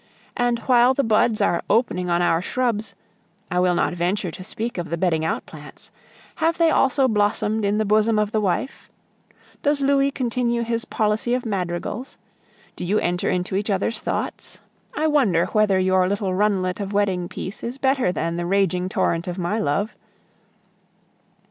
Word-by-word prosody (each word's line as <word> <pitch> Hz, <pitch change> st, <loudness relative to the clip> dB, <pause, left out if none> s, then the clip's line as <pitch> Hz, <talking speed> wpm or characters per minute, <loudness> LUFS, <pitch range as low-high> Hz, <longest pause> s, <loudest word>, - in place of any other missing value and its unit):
And 245 Hz, -1 st, +1 dB
while 250 Hz, 0 st, +5 dB
the 280 Hz, -, +1 dB
buds 220 Hz, -1 st, +2 dB
are 175 Hz, -4 st, +2 dB
opening 180 Hz, -6 st, +1 dB
on 175 Hz, 0 st, +2 dB
our 165 Hz, -1 st, +2 dB
shrubs 230 Hz, 0 st, -1 dB, 0.6 s
I 180 Hz, -, +1 dB
will 180 Hz, -1 st, +2 dB
not 175 Hz, -, +1 dB
venture 180 Hz, +1 st, -1 dB
to 185 Hz, -, -9 dB
speak 225 Hz, +2 st, -4 dB
of 175 Hz, -, -5 dB
the 170 Hz, -, -2 dB
bedding 165 Hz, -3 st, +1 dB
out 160 Hz, -, -2 dB
plants 150 Hz, -2 st, -12 dB, 0.5 s
have 330 Hz, 0 st, +1 dB
they 330 Hz, -1 st, +4 dB
also 270 Hz, 0 st, +3 dB
blossomed 210 Hz, 0 st, +1 dB
in 200 Hz, +1 st, +1 dB
the 215 Hz, -, +1 dB
bosom 215 Hz, +2 st, +3 dB
of 210 Hz, 0 st, +1 dB
the 215 Hz, -, 0 dB
wife? 200 Hz, +7 st, -2 dB, 0.7 s
Does 290 Hz, 0 st, +1 dB
Louis 275 Hz, 0 st, +3 dB
continue 240 Hz, -3 st, -1 dB
his 230 Hz, 0 st, -2 dB
policy 220 Hz, +3 st, 0 dB
of 250 Hz, -, -3 dB
madrigals? 195 Hz, +4 st, -4 dB, 0.6 s
Do -, -, -6 dB
you 195 Hz, +4 st, +1 dB
enter 175 Hz, -2 st, 0 dB
into 180 Hz, +1 st, -1 dB
each 205 Hz, +3 st, -1 dB
other's 200 Hz, +3 st, 0 dB
thoughts? -, -, -4 dB, 0.4 s
I 310 Hz, -, 0 dB
wonder 250 Hz, -, +3 dB
whether 215 Hz, -3 st, +3 dB
your 185 Hz, 0 st, +2 dB
little 200 Hz, -2 st, -1 dB
runlet 190 Hz, -2 st, 0 dB
of 200 Hz, 0 st, -4 dB
wedding 190 Hz, -4 st, 0 dB
peace 195 Hz, -, -6 dB
is 240 Hz, +3 st, -4 dB
better 265 Hz, -7 st, +1 dB
than 170 Hz, -1 st, -2 dB
the 175 Hz, -, -2 dB
raging 185 Hz, -1 st, +1 dB
torrent 170 Hz, -1 st, 0 dB
of 180 Hz, 0 st, -4 dB
my 185 Hz, +5 st, -1 dB
love! 175 Hz, +7 st, -1 dB
205 Hz, 175 wpm, -22 LUFS, 180-235 Hz, 0.7 s, while